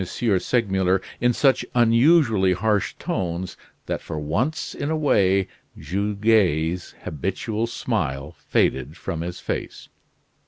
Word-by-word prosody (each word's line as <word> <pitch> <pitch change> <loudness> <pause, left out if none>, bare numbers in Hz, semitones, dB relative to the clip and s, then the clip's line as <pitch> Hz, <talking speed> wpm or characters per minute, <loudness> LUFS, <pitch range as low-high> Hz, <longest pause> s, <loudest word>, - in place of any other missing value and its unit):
Segmuller 95 -2 +1 0.2
in 125 +1 +3
such 130 +1 +3
unusually 115 - +4
harsh 105 +2 0
tones 90 0 -3 0.3
that - - -3
for 80 - -6
once 100 - -2
in 145 - -3
a 160 - 0
way 100 -10 +3 0.3
Goguet's 95 -2 +1
habitual 105 - -2
smile 75 - -2
faded 70 +5 -1
from 80 - -4
his 90 +1 -5
face. - - -5
95 Hz, 110 wpm, -23 LUFS, 85-115 Hz, 0.3 s, unusually